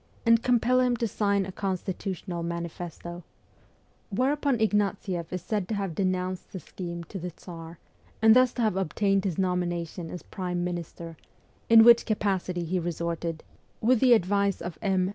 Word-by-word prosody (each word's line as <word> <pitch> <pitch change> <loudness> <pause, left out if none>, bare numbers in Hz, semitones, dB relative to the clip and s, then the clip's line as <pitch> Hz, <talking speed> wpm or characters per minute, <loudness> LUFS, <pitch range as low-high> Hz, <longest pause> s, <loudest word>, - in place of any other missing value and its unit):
and 230 0 +5
compel 250 0 +3
him 250 -1 +2
to 230 - 0
sign 200 -1 +1
a 190 - -6
constitutional 185 -1 -4
mani 170 0 -3
festo; 175 +1 -8 0.9
whereupon 270 +5 +1
Ignatieff 200 -5 0
is 180 -2 -4
said 210 -5 -2
to 220 - -2
have 195 -4 -2
denounced 185 0 -2
the 190 - -6
scheme 170 +1 -7
to 190 +4 -8
the 180 +1 -4
Tsar, 165 -1 -10 0.4
and 220 0 +6
thus 255 -1 +5
to 240 - -1
have 215 -4 +1
obtained 195 +2 +1
his 180 -5 -1
nomination 175 -2 -2
as 180 - -7
prime 180 -2 -3
minister, 170 -2 -5 0.5
in 225 -1 +9
which 235 0 +7
capacity 190 -4 -1
he 180 +2 -1
resorted, 170 -1 -3 0.4
with 245 +2 +3
the 255 0 +6
advice 200 -1 +2
of 175 -2 -7
M. 190 -2 +1
185 Hz, 160 wpm, -27 LUFS, 175-215 Hz, 0.9 s, in